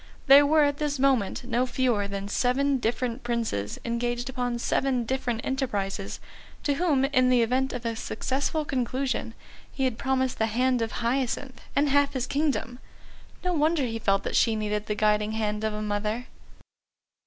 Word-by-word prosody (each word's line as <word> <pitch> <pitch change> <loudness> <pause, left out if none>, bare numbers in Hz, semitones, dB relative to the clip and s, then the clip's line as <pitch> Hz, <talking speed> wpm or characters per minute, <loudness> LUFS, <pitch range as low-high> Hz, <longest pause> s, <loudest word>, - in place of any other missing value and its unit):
There 280 +1 +8
were 310 +1 +5
at 285 0 +1
this 295 -1 -1
moment 260 -7 +1
no 245 +1 0
fewer 245 -6 +1
than 200 0 -5
seven 265 +5 +1
different 240 +2 -1
Princes 230 - -2
engaged 240 +1 -2
upon 245 -2 -2
seven 255 +1 0
different 240 -2 -2
enterprises, 205 -8 -2 0.4
to 285 - +2
whom, 280 -3 +2
in 255 -2 +3
the 245 -2 +4
event 260 +3 +1
of 245 -1 -6
a 230 0 -1
successful 280 +6 -2
conclusion, 255 -2 -2 0.4
he 270 - -3
had 255 -3 0
promised 260 -1 0
the 220 - +2
hand 250 +2 +1
of 225 0 -1
Hyacinth 260 +1 -1
and 290 +1 +3
half 285 0 +3
his 260 -2 -1
kingdom. 280 -4 -1 0.6
No 360 0 0
wonder 315 -1 +2
he 225 -1 -3
felt 195 -2 +1
that - - -3
she 225 -2 +3
needed 210 0 -2
the 210 - -1
guiding 210 0 +1
hand 210 -1 -2
of 220 - 0
a 210 - -3
mother. 210 +3 -2
245 Hz, 170 wpm, -26 LUFS, 225-270 Hz, 0.6 s, There